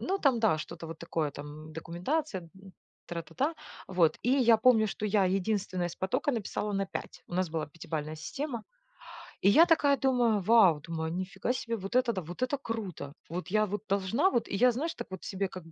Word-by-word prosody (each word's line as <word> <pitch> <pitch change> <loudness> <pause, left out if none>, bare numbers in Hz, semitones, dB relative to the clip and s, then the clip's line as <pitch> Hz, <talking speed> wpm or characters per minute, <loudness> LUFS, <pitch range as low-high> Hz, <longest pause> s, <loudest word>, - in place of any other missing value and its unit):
ну 390 +2 -1
там 265 -8 +3
да, 205 -9 +3
что-то 165 - -7
вот 165 0 -8
такое, 160 -3 -2
там 150 +2 -9
документация, 175 - -3 0.6
тра-та-та. 175 - -2 0.3
Вот, 170 -4 +3
и 245 -2 +5
помню, 225 -4 +6
что 210 - -4
я 200 -2 +3
единственная 185 -1 0
с - - -9
потока 190 +9 0
написала 210 -2 -2
на 195 0 0
5. - - -7
У 175 - -8
нас 185 -2 0
была 160 -2 -2
пятибалльная 155 0 -5
система. 240 - -4 0.8
И 195 - +5
я 320 +10 +8
такая 290 -5 +4
думаю: 240 -6 +2
"Вау, 190 -7 +6
думаю 160 0 -4
нифига 185 +7 -2
себе, 230 -2 -3
вот 195 +5 -6
это 255 -2 +3
да, 185 - -3
вот 175 +8 -9
это 270 +3 0
круто! 205 - -5 0.2
Вот 180 +2 -4
я 215 +1 +3
вот 205 +1 -4
должна 200 - +2
вот" 235 - 0
и - - -3
я 250 +4 +5
знаешь 305 +8 -3
так - - -6
вот 190 - -7
себе 195 0 -2
как 185 -2 -9
бы 165 - -14
195 Hz, 200 wpm, -30 LUFS, 170-240 Hz, 0.8 s, я